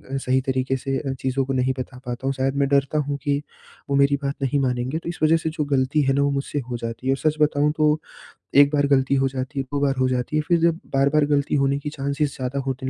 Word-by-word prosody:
अ, - - +1
सही 130 0 +1
तरीक़े 130 0 -1
से 135 +1 -2
अ, 135 - -3
चीज़ों 130 +1 0
को 135 - -2
नहीं 130 0 +1
बता 130 0 -6
पाता 125 +2 -4
हूँ। 135 - +1
शायद 135 +1 -1
मैं 140 0 +2
डरता 140 +1 +2
हूँ 145 -1 -2
कि 145 -1 0 0.5
वो 140 - +1
मेरी 140 0 +4
बात 140 +1 -1
नहीं 140 +2 +1
मानेंगे, 130 +2 -1
तो 170 - -6
इस 175 - -6
वजह 160 +1 +5
से 160 0 -2
जो 155 -1 -2
ग़लती 140 +1 +1
है 135 0 +2
ना, 140 - +2
वो 140 - +2
मुझसे 140 +1 -2
हो 120 - -3
जाती 115 +2 -6
है। 135 - +4
और - - -3
सच - - -12
बताऊँ 150 0 +3
तो, 155 0 +3 0.6
1 140 0 +7
बार 145 -1 +2
ग़लती 135 -1 +2
हो 135 0 +2
जाती 135 +2 -4
है, - - 0
2 145 - -1
बार 140 -1 +2
हो 130 - +3
जाती 125 +3 -2
है, - - +2
फिर 170 -1 +3
जब 165 0 +2
बार-बार 140 +2 +3
ग़लती 145 0 +1
होने 140 0 +1
की 150 - -5
चांसेस 140 0 -2
ज़्यादा 130 0 -3
होने 130 0 -3
140 Hz, 270 wpm, -23 LUFS, 130-145 Hz, 0.6 s, 1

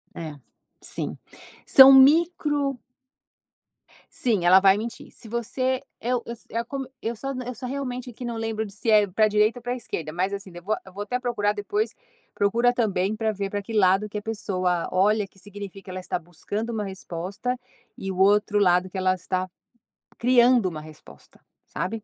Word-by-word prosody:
É, 155 -3 -6 0.5
sim. - - -3 0.5
São 270 0 +9
micro 290 -1 +4 1.4
Sim, 215 -8 0
ela 185 +2 +8
vai 195 +1 +5
mentir. 230 +2 -6
Se 220 - -12
você 255 +3 -1 0.2
eu 245 0 0
se - - -15
eu 230 +1 -2
como 270 +1 -5 0.2
eu 230 +1 -3
só 270 +5 -5 0.2
eu 250 - -5
só 250 - -7
realmente 255 -1 -4
aqui 245 +1 -8
não 235 -1 -3
lembro 225 -1 -2
de 200 - -10
se 225 +2 -3
é 210 -1 +5
pra 215 +3 +2
direita 215 +3 +2
ou - - -22
pra 245 0 -2
esquerda, 170 -10 -5
mas 185 +4 -1
assim 195 -2 -6
depo 175 +5 -3
a - - -4
eu 190 - -13
vou 200 +2 -5
até 250 +4 -2
procurar 230 -5 0
depois, 410 - -2 0.4
procura 235 +5 +2
também 210 -3 0
pra 220 0 0
ver 200 -1 -4
pra 205 +1 -3
que 215 +3 -10
lado 200 0 +3
que 210 - -5
a - - -4
pessoa 185 -5 -1
olha 205 +3 +2
que 195 - -19
significa 200 -1 -9
ela 185 0 -5
está 180 - -3
buscando 205 +7 -5
uma 215 - -2
resposta, 195 +5 -4 0.4
e 195 - -4
o 185 - -6
outro 205 +2 +3
lado 180 -1 +3
que 190 - -7
ela 185 0 +2
está, 185 +1 -3 0.7
criando 245 -2 +4
uma 155 -2 -7
resposta, 155 0 -15 0.3
sabe? 225 -1 -4
210 Hz, 185 wpm, -25 LUFS, 190-245 Hz, 1.4 s, São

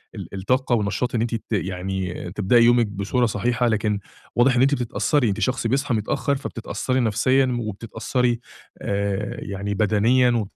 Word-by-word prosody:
ال - - -8
الطاقة 125 +6 +1
والنشاط 110 +3 -1
إن 110 - +1
أنتِ 115 0 -1
ت 115 - -5
يعني 95 -2 -3
تبدئي 105 +4 +3
يومِك 120 -2 +4
بصورة 105 +5 0
صحيحة، 120 +3 0
لكن 105 -2 0 0.4
واضح 125 +2 +4
إن 120 - +3
أنتِ 135 +2 +4
بتتأثري، 125 +1 0
أنتِ 100 - -2
شخص 130 -2 0
بيصحى 135 +2 0
متأخر، 110 +6 0
فبتتأثري 130 0 -3
نفسيًا 125 +3 +2
وبتتأثري، 115 +3 -2 0.4
آآ 100 0 -2
يعني 100 0 -4
بدنيًا 110 +5 +3
و 115 -4 0
115 Hz, 155 wpm, -23 LUFS, 100-125 Hz, 0.4 s, يومِك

